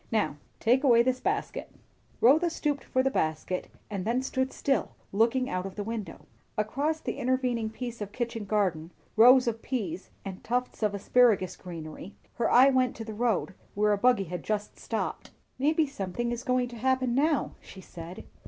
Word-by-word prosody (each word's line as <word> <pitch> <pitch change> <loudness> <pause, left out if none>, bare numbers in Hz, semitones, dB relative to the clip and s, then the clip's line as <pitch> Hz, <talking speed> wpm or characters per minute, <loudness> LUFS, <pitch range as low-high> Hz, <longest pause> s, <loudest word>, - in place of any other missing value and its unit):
"Now 215 -9 +1 0.2
take 250 +4 +3
away 235 -4 +6
this 255 0 0
basket." 405 +6 -2 0.5
Rotha 310 +8 +5
stooped 295 -4 -2
for 260 - +1
the 270 - +1
basket, 160 - -1 0.2
and 200 -3 -4
then 240 +5 0
stood 260 0 -1
still, 275 -1 0 0.2
looking 235 +5 +2
out 185 +1 -2
of 190 - -10
the 205 - -3
window. 220 -1 -6 0.3
Across 285 +9 0
the - - -4
intervening 250 -3 0
piece 235 0 -6
of 205 -1 -4
kitchen 230 -2 -3
garden, 185 -6 0 0.3
rows 250 +3 +7
of 225 -1 -1
peas 190 -9 -4 0.2
and 190 -1 -7
tufts 250 +1 -2
of 210 -2 +1
asparagus 200 -3 +3
greenery, 165 +1 -9 0.2
her 235 - +1
eye 260 +3 +7
went 255 -2 +2
to 225 - -6
the 220 - -6
road, 220 -3 0 0.2
where 210 +1 +3
a - - +1
buggy 245 -3 +4
had 180 0 -5
just 210 -1 -3
stopped. - - -3 0.3
"Maybe 310 +3 +3
something 240 -2 -3
is 240 0 -4
going 255 -1 +1
to 240 - -9
happen 255 +1 +1
now," 290 +2 +2
she 190 - -13
said. 175 -1 -9
235 Hz, 180 wpm, -28 LUFS, 200-255 Hz, 0.5 s, rows